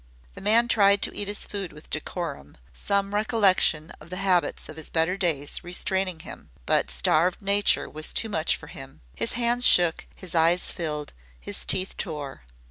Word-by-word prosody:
The -, -, -11 dB
man 225 Hz, +4 st, +4 dB
tried 200 Hz, -3 st, +3 dB
to -, -, -1 dB
eat 205 Hz, -, -3 dB
his 205 Hz, +1 st, -3 dB
food 195 Hz, -4 st, -6 dB
with 150 Hz, +1 st, -15 dB
decorum, 155 Hz, -, -4 dB, 0.2 s
some 200 Hz, -, -1 dB
recollection 200 Hz, -7 st, +2 dB
of -, -, -14 dB
the 185 Hz, -, -5 dB
habits 185 Hz, -3 st, 0 dB
of 155 Hz, 0 st, -7 dB
better 165 Hz, +3 st, +1 dB
days 160 Hz, -7 st, -1 dB
restraining 185 Hz, -1 st, -2 dB
him, -, -, -11 dB, 0.2 s
but -, -, +1 dB
starved 155 Hz, -, +1 dB
nature 200 Hz, 0 st, +2 dB
was 155 Hz, +1 st, -5 dB
too 225 Hz, -, 0 dB
much 160 Hz, -7 st, 0 dB
for -, -, -11 dB
him. -, -, -11 dB
His -, -, -2 dB
hands 240 Hz, +1 st, +1 dB
shook, 175 Hz, -7 st, +5 dB
his 185 Hz, -3 st, -8 dB
eyes 170 Hz, +2 st, +2 dB
filled, 150 Hz, -3 st, -4 dB, 0.3 s
his -, -, -4 dB
teeth 190 Hz, 0 st, +2 dB
tore. 145 Hz, -, -5 dB
180 Hz, 170 wpm, -25 LUFS, 160-200 Hz, 0.3 s, shook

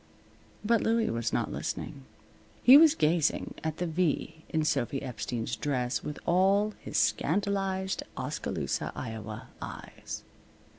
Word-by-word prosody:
But 230 Hz, 0 st, +3 dB
Louie 225 Hz, 0 st, +2 dB
was 115 Hz, -1 st, -1 dB
not -, -, 0 dB
listening. 65 Hz, -, -5 dB, 0.6 s
He 255 Hz, +3 st, +10 dB
was 315 Hz, +1 st, +8 dB
gazing 160 Hz, -, +1 dB
at 160 Hz, 0 st, -2 dB
the 175 Hz, -, -1 dB
V 160 Hz, -1 st, -1 dB
in 155 Hz, -1 st, 0 dB
Sophy 135 Hz, -2 st, 0 dB
Epstein's 115 Hz, -2 st, -3 dB
dress 125 Hz, -4 st, -1 dB
with 150 Hz, -, -5 dB
all 195 Hz, +4 st, +3 dB
his -, -, -4 dB
scandalized 195 Hz, +2 st, +1 dB, 0.2 s
Oskaloosa, -, -, -2 dB
Iowa, 110 Hz, -3 st, -6 dB
eyes. -, -, -7 dB
160 Hz, 120 wpm, -29 LUFS, 125-195 Hz, 0.6 s, He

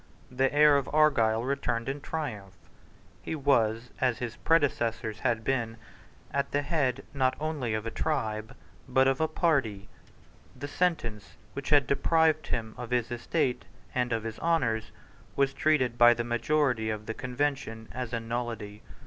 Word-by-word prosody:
The 130 Hz, +1 st, +1 dB
heir 150 Hz, 0 st, +6 dB
of 140 Hz, -, -2 dB
Argyle 120 Hz, -8 st, +3 dB
returned 130 Hz, -3 st, -1 dB
in 140 Hz, +1 st, -3 dB
triumph. 110 Hz, -, -5 dB, 0.7 s
He -, -, -4 dB
was, 120 Hz, -5 st, +1 dB
as 125 Hz, -3 st, +2 dB
his 120 Hz, -2 st, -5 dB
predecessors 115 Hz, -8 st, +1 dB
had 115 Hz, -3 st, 0 dB
been, 115 Hz, -3 st, -1 dB, 0.7 s
the 145 Hz, 0 st, 0 dB
head, 135 Hz, -4 st, 0 dB
not 130 Hz, -2 st, +1 dB
only 145 Hz, -8 st, -2 dB
of 110 Hz, 0 st, -3 dB
a 115 Hz, -, -3 dB
tribe, 110 Hz, -8 st, -2 dB, 0.3 s
but 130 Hz, +1 st, +4 dB
of 135 Hz, +2 st, +1 dB
a 160 Hz, -, +3 dB
party. 125 Hz, -, 0 dB, 0.7 s
The 145 Hz, -, -6 dB
sentence 145 Hz, -, -1 dB, 0.2 s
which 140 Hz, 0 st, -5 dB
had 145 Hz, -2 st, +5 dB
deprived 155 Hz, +3 st, +2 dB
him 110 Hz, -2 st, -3 dB
of 120 Hz, -2 st, -6 dB
his 120 Hz, -1 st, 0 dB
estate 125 Hz, +2 st, -1 dB, 0.3 s
and 125 Hz, -1 st, 0 dB
of 115 Hz, -1 st, -1 dB
his 115 Hz, -1 st, -6 dB
honours 125 Hz, -10 st, +1 dB, 0.5 s
was 140 Hz, -1 st, +2 dB
treated 130 Hz, -5 st, +1 dB
by 120 Hz, 0 st, +8 dB
the 120 Hz, -, -2 dB
majority 120 Hz, 0 st, +1 dB
of 110 Hz, 0 st, -4 dB
the 115 Hz, -, -3 dB
Convention 125 Hz, -3 st, -3 dB
as 125 Hz, -2 st, -5 dB
a 115 Hz, -, -1 dB
nullity. 115 Hz, -3 st, -4 dB
125 Hz, 155 wpm, -29 LUFS, 115-145 Hz, 0.7 s, by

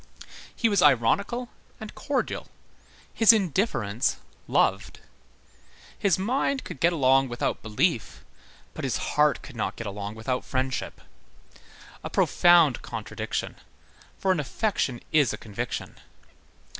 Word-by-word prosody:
He 230 Hz, -, +2 dB
was 200 Hz, -4 st, +2 dB
ironical 190 Hz, -, +2 dB, 0.3 s
and 215 Hz, -1 st, -8 dB
cordial. 285 Hz, -3 st, -3 dB, 0.7 s
His 225 Hz, -1 st, +7 dB
indifference 175 Hz, -, 0 dB, 0.3 s
loved. -, -, +1 dB, 1.0 s
His 195 Hz, -4 st, +1 dB
mind 260 Hz, +7 st, 0 dB
could -, -, -8 dB
get 170 Hz, +4 st, +4 dB
along 135 Hz, -4 st, +3 dB
without 120 Hz, -, -2 dB
belief, 110 Hz, +3 st, -1 dB, 0.5 s
but -, -, -7 dB
his -, -, -1 dB, 0.2 s
heart 150 Hz, -2 st, +2 dB
could -, -, -11 dB
not 110 Hz, -, -2 dB
get 115 Hz, -, -7 dB
along 100 Hz, +1 st, -5 dB
without 125 Hz, +3 st, -3 dB
friendship. 130 Hz, 0 st, -3 dB, 1.0 s
A -, -, -5 dB
profound 170 Hz, -7 st, +4 dB
contradiction; -, -, -5 dB, 0.6 s
for 190 Hz, -, +1 dB
an 185 Hz, -, +1 dB
affection 145 Hz, -, -1 dB
is 145 Hz, -6 st, +3 dB
a -, -, -5 dB
conviction. 105 Hz, -3 st, -6 dB
150 Hz, 120 wpm, -26 LUFS, 120-200 Hz, 1.0 s, His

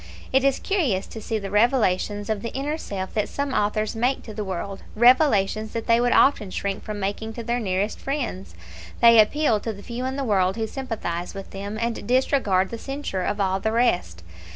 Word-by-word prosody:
It 265 Hz, 0 st, +4 dB
is 275 Hz, -1 st, +3 dB
curious 280 Hz, -, 0 dB
to 220 Hz, -, -9 dB
see 220 Hz, +1 st, -2 dB
the 200 Hz, -2 st, -5 dB
revelations 205 Hz, -2 st, +2 dB
of 215 Hz, -2 st, -1 dB
the 230 Hz, -, -4 dB
inner 285 Hz, +3 st, -1 dB
self 190 Hz, -7 st, -5 dB
that 210 Hz, -1 st, -1 dB
some 280 Hz, -1 st, -3 dB
authors 210 Hz, +1 st, 0 dB
make 250 Hz, +4 st, 0 dB
to 220 Hz, -, -9 dB
the 210 Hz, 0 st, -4 dB
world 190 Hz, 0 st, -5 dB
revelations 220 Hz, -4 st, +4 dB
that 230 Hz, -1 st, -3 dB
they 230 Hz, 0 st, +4 dB
would 245 Hz, 0 st, +2 dB
often 240 Hz, -8 st, +4 dB
shrink 195 Hz, +1 st, -3 dB
from 210 Hz, -1 st, -5 dB
making 205 Hz, +3 st, -3 dB
to 235 Hz, -, -6 dB
their 240 Hz, +2 st, -1 dB
nearest 200 Hz, -1 st, -1 dB
friends. 250 Hz, -, -4 dB, 0.4 s
They 230 Hz, -1 st, +7 dB
appeal 230 Hz, 0 st, +2 dB
to 225 Hz, -, -4 dB
the 200 Hz, -1 st, -11 dB
few 245 Hz, +1 st, -5 dB
in 260 Hz, +1 st, -2 dB
the 280 Hz, -, -2 dB
world 190 Hz, -5 st, +2 dB
who 225 Hz, -1 st, -1 dB
sympathise 215 Hz, -9 st, -4 dB
with 195 Hz, -1 st, -8 dB
them, 200 Hz, +2 st, -5 dB
and 230 Hz, -3 st, -3 dB
disregard 245 Hz, -7 st, +2 dB
the 230 Hz, -, -5 dB
censure 270 Hz, -9 st, -4 dB
of 205 Hz, +3 st, -2 dB
all 190 Hz, -1 st, +1 dB
the 220 Hz, +3 st, -1 dB
rest. 180 Hz, -, 0 dB
220 Hz, 205 wpm, -24 LUFS, 195-245 Hz, 0.4 s, They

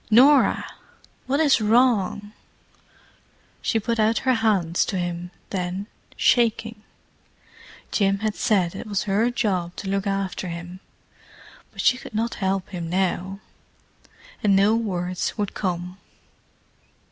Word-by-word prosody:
"Norah!—what 270 Hz, +2 st, +2 dB
is 290 Hz, -7 st, +4 dB
wrong?" 215 Hz, -3 st, +2 dB, 1.3 s
She 225 Hz, -, +1 dB
put 230 Hz, +2 st, -2 dB
out 220 Hz, +1 st, +3 dB
her 260 Hz, -, +4 dB
hands 200 Hz, -7 st, +2 dB
to 195 Hz, -, -3 dB
him 175 Hz, 0 st, -3 dB, 0.2 s
then, 185 Hz, +1 st, -3 dB, 0.3 s
shaking. 225 Hz, -2 st, +2 dB, 1.1 s
Jim 195 Hz, -1 st, +2 dB
had 215 Hz, -, 0 dB
said 185 Hz, -7 st, +1 dB
it 195 Hz, -, -7 dB
was 205 Hz, -2 st, -1 dB
her 210 Hz, +4 st, +1 dB
job 185 Hz, -8 st, -1 dB
to 200 Hz, -, -7 dB
look 195 Hz, +1 st, -1 dB
after 195 Hz, -1 st, -2 dB
him, 175 Hz, +1 st, -7 dB, 0.9 s
but -, -, -5 dB
she 250 Hz, -, +3 dB
could -, -, -10 dB
not 230 Hz, +2 st, 0 dB
help 190 Hz, 0 st, -1 dB
him 175 Hz, -3 st, -5 dB
now. 190 Hz, +2 st, -1 dB, 1.0 s
And 200 Hz, -2 st, +4 dB
no 200 Hz, +3 st, +4 dB
words 185 Hz, -5 st, -2 dB
would 205 Hz, -2 st, -2 dB
come. 180 Hz, -1 st, -3 dB
200 Hz, 125 wpm, -24 LUFS, 180-225 Hz, 1.3 s, is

